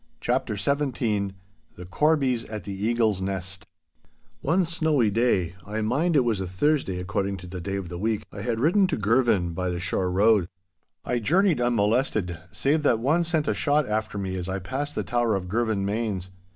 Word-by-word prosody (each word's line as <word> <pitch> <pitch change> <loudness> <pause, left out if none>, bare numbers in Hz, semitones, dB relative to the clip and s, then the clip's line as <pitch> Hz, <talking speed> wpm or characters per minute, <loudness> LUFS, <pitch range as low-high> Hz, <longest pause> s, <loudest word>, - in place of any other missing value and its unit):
*CHAPTER 110 - -1
XVII* 115 -7 0 0.4
*THE 90 - -9
CORBIES 135 - +1
AT 110 -3 -6
THE 100 - -5
EAGLE'S 110 -5 +1
NEST* 95 0 -4 0.7
One 180 +3 +2
snowy 155 -9 +1
day, 100 -6 +1
I 105 +2 -3
mind 150 +10 +1
it 140 - +6
was 110 -5 0
a 95 - -3
Thursday 95 - 0
according 100 +1 -2
to 90 - -10
the 90 0 -7
day 95 +3 -3
of 95 -3 -4
the 85 -1 -6
week, 110 +1 -1
I 100 - -6
had 115 0 -1
ridden 180 - +4
to 170 - -1
Girvan 105 -5 +2
by 90 +2 -2
the 90 -1 -3
shore 90 0 -1
road. 100 -1 +3 0.6
I 125 - 0
journeyed 170 - +2
unmolested 110 -6 +1
save 145 - +1
that 140 -6 +3
one 145 +9 +2
sent 160 -3 0
a - - +2
shot 145 -1 +1
after 105 -1 -2
me 95 -1 -3
as 90 0 -4
I 95 - -1
passed 135 +10 -4
the - - -1
tower 120 -3 +1
of 95 -2 -3
Girvanmains. 105 -2 -1
110 Hz, 185 wpm, -25 LUFS, 95-135 Hz, 0.7 s, it